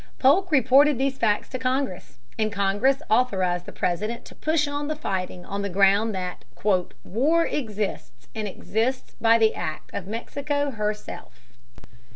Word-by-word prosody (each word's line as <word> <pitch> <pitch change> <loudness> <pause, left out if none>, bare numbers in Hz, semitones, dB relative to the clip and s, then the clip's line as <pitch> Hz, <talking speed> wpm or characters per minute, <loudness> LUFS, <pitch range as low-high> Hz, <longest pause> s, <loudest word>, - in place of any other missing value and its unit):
Polk 340 +8 +4
reported 275 +1 +5
these 270 +1 -1
facts 210 -2 +1
to 255 - -4
Congress, 255 - -2 0.2
and 215 0 +1
Congress 205 +8 +1
authorized 190 -7 +1
the - - -6
President 215 +7 -2
to - - -12
push 310 -1 +1
on 285 0 -3
the 310 - -2
fighting 185 -10 -4
on 200 0 -4
the 200 - -2
ground 200 +3 +3
that 180 -1 -5 0.6
"war 300 - +2
exists, 210 - -4
and 215 -1 -3
exists 225 +6 -2
by 230 0 +6
the 220 -1 +3
act 155 -2 -5
of 185 - -5
Mexico 285 +6 -2
herself." 210 - -5
225 Hz, 150 wpm, -25 LUFS, 195-275 Hz, 0.6 s, by